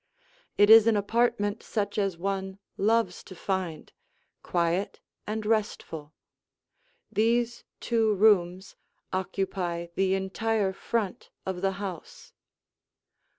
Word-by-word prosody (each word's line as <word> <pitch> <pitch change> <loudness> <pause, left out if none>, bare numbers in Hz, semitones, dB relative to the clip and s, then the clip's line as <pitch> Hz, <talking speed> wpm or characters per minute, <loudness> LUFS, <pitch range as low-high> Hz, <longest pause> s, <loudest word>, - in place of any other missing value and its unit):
It 205 +1 +6
is 225 0 +9
an 225 -2 +4
apartment 205 0 +1
such 205 -1 -2
as 195 -4 0
one 190 +1 -3 0.2
loves 220 -2 +1
to 185 - -11
find 180 -4 -3 0.5
quiet 175 +3 -1 0.3
and 215 0 -3
restful. 205 -8 -2 1.0
These 235 +3 +1 0.2
two 225 -3 +1
rooms 190 -2 +3 0.4
occupy 185 -2 -2
the 190 +1 +2
entire 195 +1 0
front 210 0 -3 0.2
of 185 -1 -3
the 195 0 +1
house. 190 -3 -8
195 Hz, 105 wpm, -27 LUFS, 185-220 Hz, 1.0 s, is